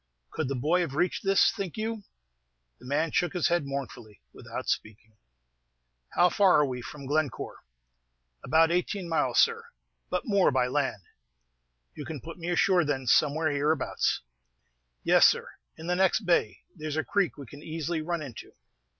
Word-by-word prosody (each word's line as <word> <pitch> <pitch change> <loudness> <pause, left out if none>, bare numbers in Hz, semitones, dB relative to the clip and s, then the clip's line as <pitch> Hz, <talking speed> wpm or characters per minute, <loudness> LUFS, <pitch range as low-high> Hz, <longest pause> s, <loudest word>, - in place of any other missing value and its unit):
"Could 155 - -2
the 140 - -2
boy 155 +8 +1
have 150 -6 -3
reached 180 +4 0
this, 195 0 +4
think 195 -5 -5
you?" 220 0 -3 0.8
The 125 - -13
man 150 +4 0
shook 175 +5 0
his 180 -2 +1
head 170 -4 0
mournfully, 125 -6 -6
without - - -7
speaking. 110 0 -4 1.0
"How 175 - +5
far 190 +1 +4
are 150 - +4
we 125 -2 -4
from 140 +3 -9
Glencore?" 145 +1 -2 0.9
"About 160 +4 +4
eighteen 180 +1 -1
miles, 165 -1 0
sir; 460 0 +3 0.4
but - - -2
more 200 -5 +3
by 130 -2 +2
land." 130 -6 -1 0.9
"You 150 - -7
can 155 -3 -6
put 165 +5 -10
me 170 +1 -4
ashore, 180 0 +3
then, 140 -3 -2
somewhere 150 +5 +3
hereabouts." 145 +1 0 0.8
"Yes, - - +6
sir, - - -1 0.3
in 160 - -9
the 180 +1 0
next 190 +4 +3
bay; 175 - +1
there's 155 -2 -5
a 155 - +1
creek 200 -6 0
we 140 - -8
can 145 +4 -12
easily 160 +1 -3
run 170 0 -3
into." 125 -6 -10
160 Hz, 165 wpm, -28 LUFS, 140-180 Hz, 1.0 s, Yes